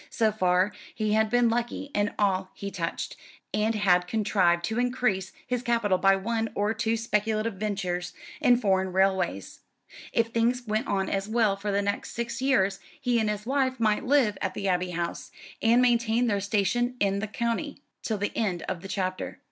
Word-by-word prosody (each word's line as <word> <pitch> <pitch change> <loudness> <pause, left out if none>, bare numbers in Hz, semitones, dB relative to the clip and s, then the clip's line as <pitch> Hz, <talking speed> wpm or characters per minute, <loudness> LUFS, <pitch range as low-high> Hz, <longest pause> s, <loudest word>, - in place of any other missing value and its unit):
So 220 -2 +2
far 185 -1 +2 0.2
he 215 -1 0
had 220 0 +3
been 245 +1 +3
lucky 240 +5 -2
in 205 0 0
all 190 -2 +1
he 200 0 -6
touched, 170 -3 -4 0.4
and 215 +2 +1
had 180 -4 +3
contrived 185 -5 +2
to 220 +2 -2
increase 245 -7 0
his 250 -1 -1
capital 230 -6 +1
by 195 +1 +5
one 225 +3 -1
or 205 +2 +1
two 225 0 0
speculative 220 0 0
ventures 185 -3 -3 0.3
in 245 -1 +5
foreign 190 -5 +1
railways. 190 - 0 0.5
If 230 0 +1
things 235 +2 +1
went 215 +3 -1
on 195 -1 0
as 195 +1 -2
well 220 -3 +2
for 200 +1 -3
the 200 0 +1
next 200 0 -3
six 235 +2 -4
years 200 -8 +2 0.2
he 245 -1 +1
and 215 -1 +1
his 210 0 -3
wife 260 -1 0
might 215 -2 +2
live 255 -6 +2
at 190 - -2
the 195 - -2
Abbey 180 -1 +1
House, 170 -1 -4 0.3
and 235 +2 +4
maintain 235 -1 +2
their 205 -4 +1
station 220 +5 0
in 200 -1 +1
the 215 - -3
county, 235 +7 -3 0.2
till 220 - -2
the 205 +1 -3
end 190 -7 -1
of 170 - -4
the 195 - -7
chapter. 185 -1 -3
210 Hz, 185 wpm, -27 LUFS, 195-235 Hz, 0.5 s, by